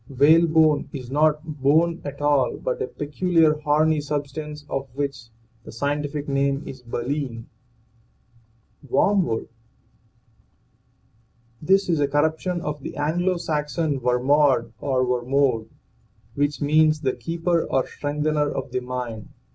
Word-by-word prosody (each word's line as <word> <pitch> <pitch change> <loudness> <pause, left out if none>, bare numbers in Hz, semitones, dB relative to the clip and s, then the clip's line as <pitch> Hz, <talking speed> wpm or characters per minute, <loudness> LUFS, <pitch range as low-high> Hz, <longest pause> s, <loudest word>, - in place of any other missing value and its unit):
WHALEBONE 155 +2 +4
is 130 -3 -7
not 150 +1 +2 0.2
bone 165 +5 +3
at 145 0 -7
all 145 -3 +2
but - - -3
a - - -1
peculiar 160 +1 +1
horny 155 0 +2
substance 150 +1 -5
of 135 0 -3
which 140 -3 -3 0.4
the - - -10
scientific 145 +3 -2
name 140 +1 0
is 130 -1 -9
baleen. 120 0 -4 1.4
WORMWOOD. 170 - +1 2.1
This 195 +4 +3
is 165 -4 +1
a 145 - +2
corruption 160 +5 0
of 150 -2 -4
the - - -7
Anglo 175 +5 0
Saxon 150 -2 -1
wermod 125 -1 +2
or 130 -2 0
wermode, 125 -2 +1 0.6
which 145 +1 -1
means 155 +1 +3
the 130 -3 0
keeper 170 0 -1
or 130 - +1
strengthener 150 0 -1
of 130 -2 -5
the 130 - -1
mind. 125 -3 -6
145 Hz, 120 wpm, -23 LUFS, 135-155 Hz, 2.1 s, WHALEBONE